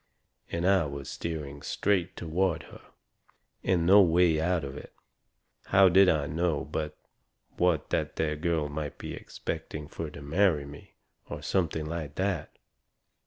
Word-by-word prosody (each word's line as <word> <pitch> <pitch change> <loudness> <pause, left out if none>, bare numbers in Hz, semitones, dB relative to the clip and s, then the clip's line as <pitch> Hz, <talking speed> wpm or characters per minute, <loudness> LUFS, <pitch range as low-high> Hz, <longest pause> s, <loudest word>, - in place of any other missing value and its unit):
And 85 +1 -1
I 95 -4 +4
was 70 -1 -6
steering 75 -4 -5
straight 95 -4 0
toward 85 +2 0
her, - - -13 0.8
and 90 -3 +2
no 100 +4 +8
way 85 -3 +4
out 85 -1 +1
of 70 0 -6
it. 75 - -10 0.7
How 95 -1 +6
did 95 +1 +6
I 75 -3 +2
know 80 0 -1
but 75 0 -4 0.6
what 90 -4 +1
that - - -1
there 75 -1 0
girl 80 -1 0
might 75 0 -5
be - - -6
expecting 75 -2 -6
fur 80 +2 -5
to 70 -1 -10
marry 80 -1 +2
me, 70 +1 -12 0.3
or - - -6
something 80 -4 0
like 80 -3 -5
that? 95 0 -2
80 Hz, 150 wpm, -29 LUFS, 75-90 Hz, 0.8 s, no